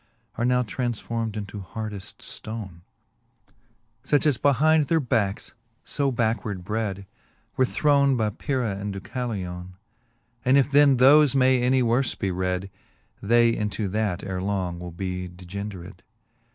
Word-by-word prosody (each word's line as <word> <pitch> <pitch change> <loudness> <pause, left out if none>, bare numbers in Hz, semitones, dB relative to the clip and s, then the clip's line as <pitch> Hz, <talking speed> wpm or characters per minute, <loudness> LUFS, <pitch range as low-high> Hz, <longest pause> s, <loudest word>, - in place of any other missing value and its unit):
Are 120 - -1
now 125 0 +3
transformed 115 -2 -3
into 105 0 -6
hardeft 105 +1 -7
ftone; 105 -6 -8 1.2
Such 145 0 +2
as 145 -5 +2
behind 150 +2 +3
their 165 +2 +3
backs 115 -8 -1 0.3
(fo 140 -1 -1
backward 110 -5 -1
bred) 100 -1 -3 0.5
Where 130 - +2
thrown 140 -2 +3
by 110 -2 0
Pyrrha 120 -3 -2
and 100 0 -4
Deucalione: 95 -4 -5 0.7
And 130 +2 +4
if 140 0 +2
then 140 -2 +6
thoie 140 +2 +6
may 130 -1 +4
any 130 +1 +3
worle 120 +2 +1
be 95 -3 -1
red, 90 +1 -2 0.5
They 115 +2 +4
into 105 0 -2
that 105 -3 -1
ere 95 -1 -3
long 95 -3 -2
will 90 0 -6
be 90 +1 -4
degendered. 95 +1 -8
110 Hz, 135 wpm, -25 LUFS, 95-130 Hz, 1.2 s, then